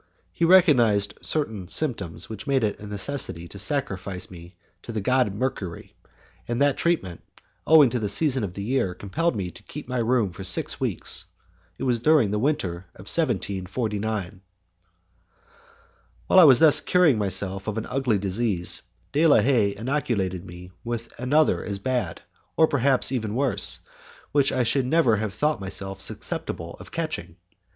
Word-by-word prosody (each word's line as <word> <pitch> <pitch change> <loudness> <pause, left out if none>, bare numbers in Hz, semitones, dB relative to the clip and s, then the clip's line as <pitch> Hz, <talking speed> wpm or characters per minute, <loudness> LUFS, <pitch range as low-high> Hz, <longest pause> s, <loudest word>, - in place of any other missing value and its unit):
He 170 - +1
recognized 125 - +4
certain 110 - -2
symptoms 100 - -1
which 110 -1 -8
made 135 -3 +1
it 105 -2 -1
a 105 - -9
necessity 100 - -3
to 100 - -10
sacrifice 95 -7 -2
me 85 0 -12 0.3
to - - -8
the 110 - -3
god 125 +1 +1
Mercury, 105 -7 -4 0.5
and 120 0 -2
that 145 -1 +3
treatment, 95 - -1 0.5
owing 150 -6 +7
to 125 - -1
the 105 -2 -2
season 135 +1 +2
of 95 -3 -5
the 100 - -5
year, 110 -6 -1
compelled 150 - -2
me 95 -4 -4
to - - -14
keep 150 - -9
my 125 -1 -2
room 115 -4 +1
for 95 - -9
six 95 0 +3
weeks. - - -2 0.5
It - - -6
was 125 -3 +1
during 140 -5 +3
the 105 - 0
winter 95 - -2
of 95 - -13
1749. 105 - -2 1.8
While 190 - +5
I 180 - +9
was 135 -5 +8
thus 160 -2 +7
curing 170 -10 +3
myself 95 0 -2
of 110 0 -3
an 110 - -3
ugly 125 -4 0
disease, 95 -2 -1 0.3
De 155 +3 +3
la 150 - +6
Haye 110 -7 +2
inoculated 100 -7 -2
me 90 +1 -11
with 115 -1 -5
another 145 +5 +2
as 100 - -3
bad, 105 -5 -3 0.3
perhaps 140 -5 +3
even 110 -5 -2
worse, 135 0 +1 0.5
which 140 -1 +3
I 130 - +1
should 130 +2 +1
never 130 -7 +3
have 105 -1 -4
thought 150 -5 0
myself 95 0 -4
susceptible 85 -2 -4
of - - -12
catching. 155 - -4
110 Hz, 160 wpm, -24 LUFS, 95-135 Hz, 1.8 s, I